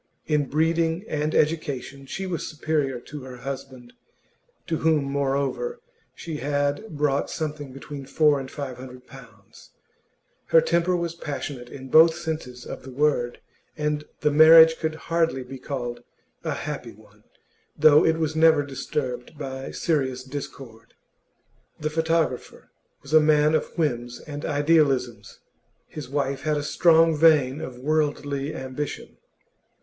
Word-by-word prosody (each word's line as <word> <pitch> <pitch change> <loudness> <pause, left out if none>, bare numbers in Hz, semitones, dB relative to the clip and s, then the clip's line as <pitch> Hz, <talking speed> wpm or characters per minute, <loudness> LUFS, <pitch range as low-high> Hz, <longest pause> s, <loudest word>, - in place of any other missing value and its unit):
In 150 -3 +1
breeding 165 +4 +1
and 150 -2 -2
education 140 -3 -1
she 195 +7 -4
was 180 -3 -3
superior 150 -4 -1
to 150 +2 -9
her 130 -1 -9
husband, 130 -1 -8 0.7
to 165 - -1
whom, 160 -2 +2
moreover, 140 - -1 0.4
she 160 -3 -6
had 145 +6 -2
brought 145 -2 +1
something 150 -3 -4
between 135 +1 -9
four 150 0 +3
and 130 -1 -7
five 135 -4 -6
hundred 125 0 -11
pounds; 115 -8 -16 0.8
her 165 - +6
temper 170 +2 +1
was 170 -1 -2
passionate 140 -6 -6
in 135 -1 -10
both 160 +3 +7
senses 155 -7 -5
of - - -7
the 130 - -11
word, 130 -3 0 0.4
and 150 0 -1 0.2
the 150 - +2
marriage 160 +2 +8
could 160 -1 -2
hardly 165 -4 -1
be 130 +1 -9
called 125 -3 -5 0.4
a - - -2
happy - - -6
one, - - -21 0.5
though 155 0 +6
it 160 0 +2
was 160 -1 -1
never 160 -2 +5
disturbed 135 0 -4
by 135 -2 -6
serious 130 -6 -1
discord. 130 -4 -9 0.8
The 155 0 -2
photographer 160 -4 -1 0.3
was 140 - -9
a 155 - +9
man 150 0 +4
of 155 - -1
whims 120 -6 -1
and 145 -1 -7
idealisms; 145 -7 +1 0.4
his 145 -5 -9
wife 140 -1 -1
had 155 -1 0
a 145 - -2
strong 165 +1 +4
vein 150 -3 +4
of 125 -1 -7
worldly 145 0 -1
ambition. 130 0 -6
145 Hz, 140 wpm, -24 LUFS, 135-160 Hz, 0.8 s, a